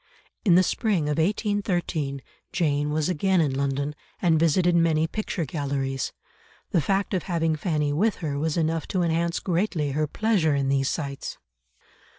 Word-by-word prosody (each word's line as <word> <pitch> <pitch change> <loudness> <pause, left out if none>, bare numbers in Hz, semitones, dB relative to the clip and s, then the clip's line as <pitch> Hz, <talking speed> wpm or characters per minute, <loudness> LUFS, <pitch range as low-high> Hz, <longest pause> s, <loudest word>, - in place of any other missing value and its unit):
In 180 -6 +5
the 185 - +6
spring 200 -3 0
of 150 +1 -1
1813 175 - -1 0.3
Jane 145 -4 +1
was 155 0 0
again 185 +2 +2
in 150 -5 +2
London, 140 +1 -1 0.3
and 165 -3 +3
visited 170 +2 +3
many 165 -2 +3
picture 185 -1 -3
galleries. 135 -2 -2 0.6
The 170 - +3
fact 195 +7 0
of 185 - +1
having 165 -2 +1
Fanny 150 -3 0
with 205 +7 +2
her 145 -4 -3
was 160 +2 -1
enough 165 -1 0
to 185 -2 0
enhance 170 +1 0
greatly 170 -5 0
her 150 +2 0
pleasure 185 -5 +1
in 135 -1 0
these 135 0 +2
sights. 140 -4 -4
160 Hz, 160 wpm, -25 LUFS, 145-180 Hz, 0.6 s, the